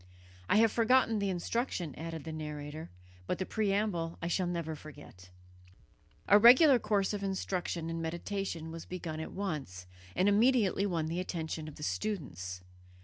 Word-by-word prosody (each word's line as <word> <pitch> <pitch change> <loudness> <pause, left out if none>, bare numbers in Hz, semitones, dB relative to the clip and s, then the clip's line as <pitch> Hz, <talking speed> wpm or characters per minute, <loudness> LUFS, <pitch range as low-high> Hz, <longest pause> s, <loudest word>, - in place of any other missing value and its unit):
I - - +4
have 225 0 +5
forgotten 230 -1 +3
the 200 -1 0
instruction," 180 - -2
added 165 0 -6
the 160 - -6
narrator, 150 0 -6 0.4
"but - - -1
the 185 - -2
preamble 200 -6 -1
I 170 - -3
shall 180 +1 0
never 170 -2 -3
forget." 145 -12 -13 1.0
A 205 - +7
regular 255 +4 +8
course 210 -2 +1
of 205 - -3
instruction 185 -3 -2
and 165 0 -3
meditation 170 0 -4
was 165 0 -7
begun 170 -3 -5
at 160 - -5
once, 145 - -4 0.3
and 185 - +3
immediately 205 -2 +3
won 165 -4 -1
the 165 +3 -2
attention 160 -3 -4
of 150 - -9
the 150 - -9
students. 95 - -3
175 Hz, 155 wpm, -32 LUFS, 160-205 Hz, 1.0 s, regular